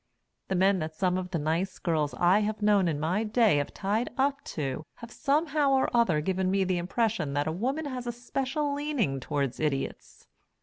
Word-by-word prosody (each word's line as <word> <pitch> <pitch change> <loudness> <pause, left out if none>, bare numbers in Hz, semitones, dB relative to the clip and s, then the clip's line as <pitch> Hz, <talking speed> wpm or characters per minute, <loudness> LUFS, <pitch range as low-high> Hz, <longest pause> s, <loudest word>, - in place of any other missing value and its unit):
The 190 - -1
men 190 +1 +3
that 155 -1 -4
some 180 +1 +1
of 185 0 -3
the 175 - -1
nice 165 +5 -1
girls 155 -4 -1
I 180 +4 +4
have 215 0 -2
known 205 -3 +4
in 155 -3 -1
my 175 +8 0
day 220 -5 +3
have 145 - -1
tied 210 +5 -1
up 275 +1 +1
to 140 -2 -3
have 235 0 -11
somehow 290 -1 +1
or 265 -2 +2
other 185 -11 +3
given 185 +2 0
me 195 0 +2
the 185 -1 0
impression 195 -4 -1
that 145 0 0
a 160 - -1
woman 260 - -2
has 255 -3 -5
a - - 0
special 270 +4 -2
leaning 280 - -1
toward 140 -1 -2
Idiots. 150 -3 -3
195 Hz, 200 wpm, -28 LUFS, 160-245 Hz, -, I